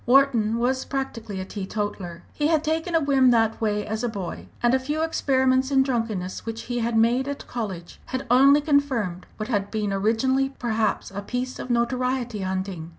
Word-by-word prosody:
Wharton 240 -4 +4
was 260 +2 +1
practically 230 -7 -4
a 185 - -4
teetotaller. 190 -3 -4
He 295 - 0
had 315 -1 +2
taken 320 +2 -1
a - - +5
whim 275 -3 +4
that 225 -2 +2
way 210 -2 0
as 220 +2 -3
a 240 - +1
boy, 195 -6 -6 0.2
and 240 +1 +4
a 265 - +4
few 300 +4 -2
experiments 260 -4 +2
in 270 -1 +4
drunkenness 225 -8 -2
which 225 0 -5
he 245 0 -3
had 230 0 0
made 240 +4 +3
at 285 0 -5
college 195 -8 -6
had 260 +1 -3
only 275 +3 +6
confirmed 265 - 0
what 215 +2 -4
had 205 -4 0
been 210 -2 -1
originally 260 +7 +1
perhaps 220 -5 -1
a 200 +1 -5
piece 250 +4 -4
of - - -6
notoriety 245 -1 0
hunting. 185 -3 -3
235 Hz, 185 wpm, -24 LUFS, 210-265 Hz, 0.2 s, only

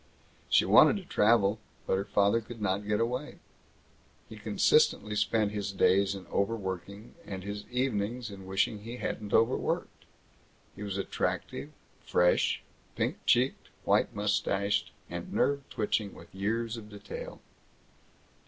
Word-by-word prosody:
She - - +5
wanted - - +7
to 195 - -7
travel, 110 - +3 0.3
but - - +1
her 100 +1 -1
father 100 +2 +3
could 115 +1 -10
not 100 0 -1
get 105 0 +1
away. 125 +6 -2 0.9
He - - -10
consistently 450 - +2
spent 105 0 +1
his 100 -1 -3
days 100 +1 +3
in 95 - -9
overworking, 100 0 -3
and 95 -2 -6
his 100 +1 -5
evenings 120 -2 -1
in 95 -1 -10
wishing 95 +2 0
he 115 +4 -7
hadn't 105 -4 -4
overworked. 115 +3 +1 0.7
He 95 - -11
was 100 -2 -3
attractive, 100 - -2 0.3
fresh, 90 0 +2 0.3
pink - - -1
cheeked, 125 +3 +2
white - - +2
mustached, 100 -1 0 0.2
and - - -6
nerve 140 -1 0
twitching 105 -1 -1
with - - -14
years 115 +4 -1
of 105 -2 -10
detail. 105 -1 -8
105 Hz, 135 wpm, -30 LUFS, 100-115 Hz, 0.9 s, wanted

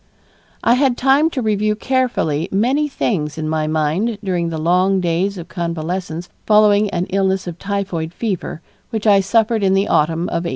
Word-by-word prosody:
I 235 - +4
had 255 -1 +2
time 275 +4 +3
to 265 -6 -3
review 210 0 +1
carefully 215 - -1
many 255 +10 +1
things 155 - -2
in 155 -1 -3
my 155 -1 -1
mind 160 +9 0
during 175 -3 -1
the 160 - -4
long 180 +4 +2
days 180 +3 -1
of 175 - -8
convalescence 170 0 -4 0.2
following 210 -1 +4
an 180 -1 -2
illness 190 -1 0
of 175 -1 -7
typhoid 195 -5 -3
fever 190 -5 -4 0.3
which 220 -1 -4
I 205 -2 +6
suffered 220 +3 +1
in 190 -1 +2
the 195 +1 +1
autumn 160 +2 +1
of 170 -1 -2
1895. - - -1
190 Hz, 175 wpm, -18 LUFS, 170-215 Hz, 0.3 s, I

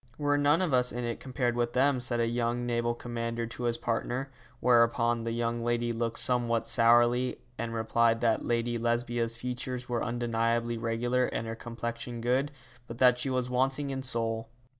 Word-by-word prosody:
'We're 145 -1 +1
none 145 +5 +3
of 165 -7 -1
us 125 -1 +3
in 120 +1 -4
it 120 -1 -3
compared 125 -2 -1
with 120 0 0
them,' 135 0 +3
said 120 -1 -1
a 115 - +3
young 120 +1 -1
naval 120 0 0
commander 115 -1 -3
to 115 +1 -6
his 120 -1 0
partner, 125 +3 -2 0.3
whereupon 115 -1 +3
the 115 - -1
young 120 0 -1
lady 120 0 0
looked 115 0 -2
somewhat 120 -2 +1
sourly, 120 +2 +3 0.2
and 115 0 -3
replied 115 +1 +2
that 115 -2 +2
Lady 120 0 0
Lesbia's 120 0 0
features 125 +1 -4
were 120 -1 -1
undeniably 120 -1 0
regular 120 +2 0
and 115 - -3
her 115 - -4
complexion 120 +1 -5
good, 130 +5 +1 0.4
but 115 - -8
that 125 -1 +5
she 135 - -2
was 130 -1 0
wanting 135 +3 0
in 135 0 -3
soul. 115 -3 -1
120 Hz, 180 wpm, -29 LUFS, 115-125 Hz, 0.4 s, that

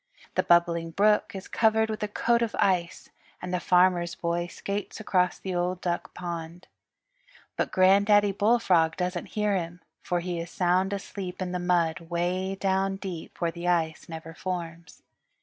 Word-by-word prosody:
The - - +2
Bubbling 170 -1 +3
Brook 210 +4 +2
is 190 - -7
covered 220 0 +2
with 215 - -5
a 210 - 0
coat 235 +3 +1
of 230 -2 -1
ice, 185 -4 0 0.3
and 180 0 -6
the 180 - +1
Farmer's 180 -1 +3
Boy 170 -1 -2
skates 200 +4 -5
across 180 -4 +1
the 190 - -5
Old 180 +1 -1
Duck 175 -1 -3
Pond. 170 0 -6 0.9
But - - -1
Granddaddy 200 +2 +5
Bullfrog 195 -6 +3
doesn't 180 -1 -2
hear 210 -1 +2
him, 175 -1 -4 0.2
for 175 - -1
he 175 0 -3
is 165 0 -5
sound 185 +2 +1
asleep 195 -2 -5
in 185 -1 -3
the 180 - -2
mud 175 -1 +1
'way 180 +3 -1
down 195 0 0
deep 185 -4 -7
where 170 -1 0
the 170 +1 -6
ice 165 -1 0
never 165 0 -8
forms. 170 -2 -6
180 Hz, 165 wpm, -27 LUFS, 170-195 Hz, 0.9 s, Granddaddy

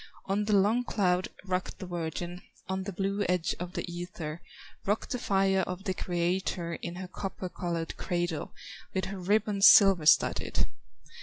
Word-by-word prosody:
On 200 +2 0
the 210 -1 +3
long 210 +5 +3
cloud 185 -6 +1 0.2
rocked 185 -1 -2
the - - -7
virgin, 175 0 -4 0.3
On 190 0 -2
the 200 - -3
blue 195 +2 -1
edge 180 -2 +1
of 180 +1 -5
the - - -3
ether, 175 -2 -6 0.4
Rocked 205 +2 -1
the 250 - -1
fire 195 -3 +2
of 185 +1 -5
the 190 -3 -1
Creator, 175 -1 -1
In 170 0 -5
her 185 0 -6
copper 190 0 -5
colored 170 -2 -3
cradle, 175 -3 -2 0.4
With 190 - 0
her 195 0 -6
ribbons 205 +1 +4
silver 195 -6 +7
studded. 150 - +4
185 Hz, 160 wpm, -29 LUFS, 175-195 Hz, 0.4 s, silver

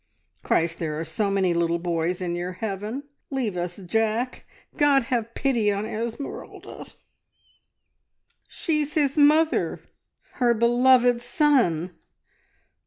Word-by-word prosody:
"Christ, 165 0 0
there 155 -2 -3
are - - -2
so 210 +4 -2
many 190 -3 +1
little 170 0 +1
boys 170 +1 -2
in 175 -1 -2
your 175 +1 -4
heaven 210 +6 -4 0.3
leave 250 -8 -2
us 175 0 -4
Jack! 225 +6 -1 0.3
God, 285 -3 +4
have 230 -1 -2
pity 235 -7 +1
on 200 +1 -2
Esmeralda! 230 +5 -6 1.6
She's 305 -3 -2
his 285 -3 +1
mother.... 310 +2 +3 0.6
_Her 240 -3 +2
beloved 245 +1 +4
son 240 - +2
225 Hz, 110 wpm, -24 LUFS, 180-265 Hz, 1.6 s, God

